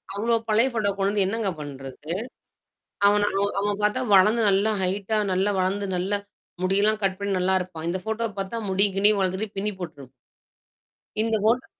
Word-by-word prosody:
அவ்ளோ 230 +3 +1
பழைய 225 +5 +3
ஃபோட்டோவ 210 -4 0
கொண்டு 195 +1 +1
வந்து 205 -2 +2
என்னங்க 210 0 -1
பண்றது? 145 +2 -7 1.0
அவன் 205 0 +3 0.2
ஒ - - +3
அவன 205 0 0
பாத்தா 210 +5 +1
வளந்து 215 +5 +5
நல்லா 200 +3 +3
ஹைட்டா 200 +3 0
நல்லா 190 +3 +1
வளந்து 195 +2 0
நல்லா 195 +3 0 0.4
முடியெல்லாம் 205 +3 +2
கட் 190 -1 +1
பண்ணி 200 0 -2
நல்லாருப்பான். 180 -3 -1
இந்த 185 - -1
ஃபோட்டோவ 220 0 -2
பாத்தா, 195 +4 -4
முடிய 200 +2 +3
கிடியும் 205 +1 +4
வளத்துட்டு 190 +3 -2
பின்னி 210 +2 -1
போட்டுருப் 145 -7 -8 1.1
இந்த 225 0 +1
போட்டோ 245 +3 +2
200 Hz, 160 wpm, -25 LUFS, 185-215 Hz, 1.1 s, வளந்து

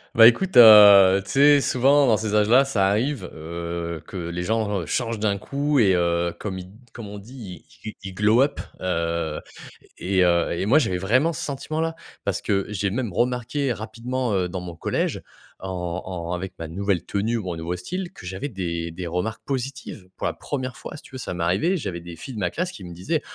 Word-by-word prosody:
Bah, 115 0 +10
écoute, 185 +10 +2
heu, 100 -4 +9
tu - - -7
sais? 145 +1 +6
Souvent, 135 +3 +3
dans 110 -3 +4
ces 110 0 -3
âges-là, 115 +6 +5
ça 100 -8 +1
arrive, 110 0 -1
heu, 85 +1 -5
que - - -11
les 85 0 -4
genres 105 -4 -1
changent 115 -3 -2
d'un 105 -2 0
coup 140 +5 -1
et 95 -4 +4
heu, 85 0 0
comme 95 -3 -4
ils 90 - -8
d 100 +4 -17 0.2
comme 115 -3 -8
on 105 - -8
dit: 105 -5 -10 0.2
«Ils 110 - -5
ils 95 - -7
glow 105 +4 +4
up» 140 +2 +1 0.2
heu, 85 -3 -2 0.6
et 95 0 +1
heu, 85 -1 +2
et 85 - -2
moi, 135 +9 +5
j'avais 90 -10 0
vraiment 130 - +2
ce - - -5
sentiment-là 155 +3 -3 0.3
parce - - -2
que 100 -1 0
j'ai 100 -1 -1
même 115 -2 -3
remarqué 125 +4 -1
rapidement, 120 +2 -3
heu, 90 -2 0
dans 90 0 -5
mon 85 -1 -8
collège, - - -2 0.4
en 95 - -6 0.4
en 85 -2 -5
avec 95 +1 -5
ma 85 - -5
nouvelle 95 +1 -1
tenue, 110 +4 -1
mon 90 -5 -4
nouveau 85 +2 -4
style, 175 - -5
que - - -13
j'avais 95 +10 -5
des 85 -5 -4
des 90 +2 -7
remarques 90 +6 -3
positives 130 -7 -5
pour - - -4
la - - -2
1re 130 -3 -5
fois. - - -8
Si - - -13
tu - - -16
veux, 130 - -6
ça 115 - -5
m'est 85 - -3
arrivé, 100 - +1
j'avais 95 - -5
des 85 -1 -9
filles 130 +10 -9
de 105 - -5
ma 90 -2 0
classe 180 - -3
qui 100 - -11
me 85 -1 -8
disaient: 145 - -2
100 Hz, 215 wpm, -23 LUFS, 90-125 Hz, 0.6 s, Bah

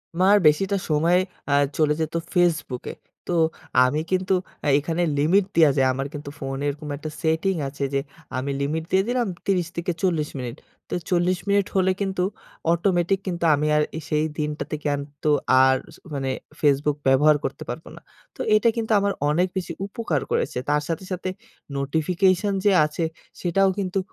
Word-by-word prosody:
আমার 190 +3 +5
বেশিটা 195 +7 +3
সময় 165 +4 +3 0.3
আ - - +4 0.2
চলে 150 -1 +3
যেত 155 - -2 0.2
ফেসবুকে। 165 -8 0 0.3
তো - - -1 0.5
আমি 135 +4 0
কিন্তু 185 +1 +1 0.3
আ - - 0
এখানে 165 +3 -2 0.2
লিমিট 180 +7 +3
দেওয়া 160 -4 +6
যায় 130 -1 +4
আমার 135 +2 -3
কিন্তু 145 -1 -6
ফোনে 135 0 -4
এরকম 150 +1 -6
একটা 155 +2 -6
সেটিং 160 +4 +1
আছে 140 +1 -5
যে, 140 - +2 0.4
আমি 140 +2 -2
লিমিট 155 +3 -1
দিয়ে 190 +1 +4
দিলাম 245 -2 0 0.2
৩০ 180 -4 +1
থেকে 170 +1 -1
৪০ 160 -5 +1
মিনিট। 120 -2 -5 0.3
তো - - -5 0.2
৪০ 180 0 +2
মিনিট 200 -1 +3
হলে 190 -1 +3
কিন্তু 190 -2 0 0.5
অটোমেটিক 175 +1 +2
কিন্তু 170 -2 -3
আমি 150 +1 0
আর 150 - +4
আ - - -2
সেই 150 0 +2
দিনটাতে 150 0 -3
কিন্তু 145 +1 -2 0.3
আর 130 0 +5 0.2
স - - -17 0.2
মানে 135 -2 -2 0.3
ফেসবুক 145 0 +3
ব্যবহার 150 +3 +5
করতে - - -4
পারবো - - -6
না। - - -13 0.3
তো - - -23 0.2
এটা 215 +2 +4
কিন্তু 225 -1 -2
আমার 200 0 +1 0.2
অনেক 175 +5 +2
বেশি 175 -2 -3
উপকার 200 - -2
করেছে। - - 0
তার 150 0 +3
সাথে, 165 +2 -3
সাথে 185 0 -2 0.5
নোটিফিকেশন 180 +7 +1
যে, 205 - +6
আছে 150 +2 -3 0.4
সেটাও 195 +2 +3
কিন্তু 190 0 -1
165 Hz, 170 wpm, -24 LUFS, 150-185 Hz, 0.5 s, দেওয়া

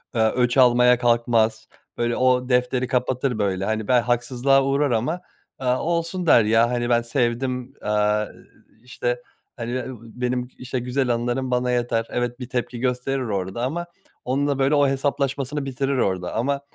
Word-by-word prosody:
eee, 115 - +2
öç 125 +1 +1
almaya 125 -1 +6
kalkmaz 115 -2 +2 0.3
böyle 120 0 0
o 125 0 +2
defteri 125 0 +1
kapatır 125 -1 0
böyle 95 -2 0
hani 110 0 -2
ben 125 -1 +4
haksızlığa 125 +3 +2
uğrar 140 +1 +1
ama, 130 +10 -1 0.4
aaa, 125 -1 +1
olsun 170 +2 -1
der 120 -8 +6
ya 115 +2 +3
hani 120 -1 -1
ben 120 -1 +3
sevdim. 125 +1 -1
Eee, 105 0 +1 0.4
iii, 110 - -30
işte 120 -1 -3 0.3
hani 120 0 -5
be 130 0 -2
ııı, 130 -2 -7
benim 125 +2 -3
işte 125 0 -4
güzel 125 +1 -1
anılarım 120 +2 -2
bana 125 0 +1
yeter 120 -2 0
evet 120 0 -2
bir 125 -1 -7
tepki 125 -1 -3
gösterir 125 +2 -1
orda 100 0 -3
ama 165 +7 -2 0.4
onunla 140 +2 0
böyle 135 +2 +3
o 145 -1 +4
hesaplaşmasını 140 +1 -1
bitirir 135 +1 -1
orda 95 -6 -1
ama 140 +4 0
125 Hz, 165 wpm, -23 LUFS, 120-135 Hz, 0.4 s, almaya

